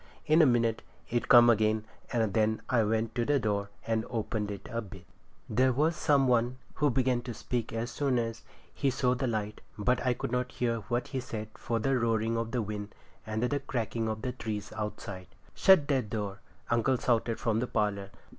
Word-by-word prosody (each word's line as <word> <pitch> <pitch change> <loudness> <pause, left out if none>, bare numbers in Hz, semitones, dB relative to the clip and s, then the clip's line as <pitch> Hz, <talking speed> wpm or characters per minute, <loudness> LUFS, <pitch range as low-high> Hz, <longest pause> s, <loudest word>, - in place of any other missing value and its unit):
In 155 +2 +5
a 155 - +7
minute 115 -2 +2 0.3
it 120 0 -1
come 120 -1 +9
again, 110 -1 +3 0.3
and 110 -4 +1
then 110 0 +1
I 120 -3 +3
went 110 +1 0
to 120 - 0
the 145 +4 +2
door 100 -3 -1 0.2
and 115 -1 0
opened 110 -2 -2
it 100 -1 -7
a 115 0 -1
bit. 95 -4 -11 0.4
There 130 +1 +3
was 155 +6 +2
some 140 -3 +3
one 120 -2 +4
outside - - -30
who 150 -1 +4
began 125 -1 +1
to 120 -2 -6
speak 120 -3 -3
as 115 +2 -3
soon 140 -3 0
as 115 -1 -2 0.3
he 140 - +1
saw 125 -1 +1
the 130 +1 -1
light, 105 -2 -3 0.2
but 125 +4 +1
I 125 -1 +2
could - - -4
not 125 0 -1
hear 115 -2 0
what 120 +2 -1
he 135 - -2
said 110 -4 -5
for 115 - -2
the 130 +3 +1
roaring 115 -1 +1
of 115 0 -1
the 120 -1 -1
wind, 105 0 -6 0.3
and 110 +1 -2
the 140 +3 +1
cracking 115 -4 -2
of 110 0 -4
the 125 - -1
trees 105 -4 -5
outside. 105 -3 -5 0.3
'Shut 190 -7 +5
that 130 -7 +1
door!' 100 -2 -3 0.3
uncle 120 +3 +3
shouted 115 -2 0
from 110 -2 +1
the 125 - -1
parlour. 100 -3 -1
115 Hz, 205 wpm, -30 LUFS, 110-125 Hz, 0.4 s, come